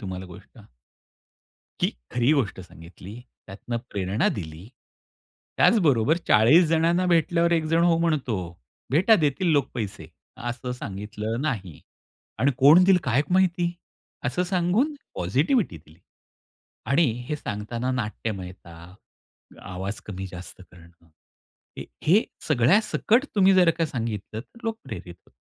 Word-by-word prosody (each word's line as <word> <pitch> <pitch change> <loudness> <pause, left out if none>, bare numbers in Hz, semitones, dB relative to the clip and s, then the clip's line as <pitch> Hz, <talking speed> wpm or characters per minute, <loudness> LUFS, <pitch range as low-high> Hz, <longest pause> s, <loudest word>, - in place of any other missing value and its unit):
तुम्हाला 95 -2 -6
गोष्ट. 90 - -15 1.2
की - - +3 0.2
खरी 125 +4 +2
गोष्ट 115 -10 -1
सांगितली, 90 +6 -12 0.3
त्यातनं 105 +4 -6
प्रेरणा 100 +1 0
दिली, 80 +3 -8 0.9
त्याचबरोबर, 155 - +3
"40 125 +12 +6
जणांना 170 +3 +2
भेटल्यावर 170 0 +2
एकजण 165 0 +2
हो 165 -1 +3
म्हणतो." 155 -10 0 0.5
"भेटा 185 - +5
देतील 145 +6 0
लोक 145 -4 +1
पैसे" 100 -9 -5 0.3
असं 125 +1 -5
सांगितलं 105 +1 -5
नाही. 100 - -4 0.6
आणि 140 +2 +2
"कोण 155 +7 +7
देईल 190 -1 +5
काय 130 +3 +2
क 165 - -7
माहिती?" 180 -2 +2 0.6
असं 130 +9 0
सांगून 190 - +1 0.2
पॉझिटिव्हिटी 140 - 0
दिली. 80 +1 -18 0.9
आणि 140 +7 +3 0.2
हे 150 - -2
सांगताना 120 +1 -4
नाट्यमयता, 95 -7 -6 0.7
आवाज 95 +3 -6
कमी-जास्त 95 -2 -8
करणं, 85 -1 -19 0.7
ह - - -4 0.2
हे 195 +8 +5 0.3
सगळ्यासकट 205 - +3
तुम्ही 195 -1 +5
जर 180 -2 +5
का 165 - +1
सांगितलं, 115 -5 -5
तर 235 - -17
लोक 225 0 -2
प्रेरित 90 -4 -8
होत - - -25
125 Hz, 120 wpm, -25 LUFS, -, 1.2 s, कोण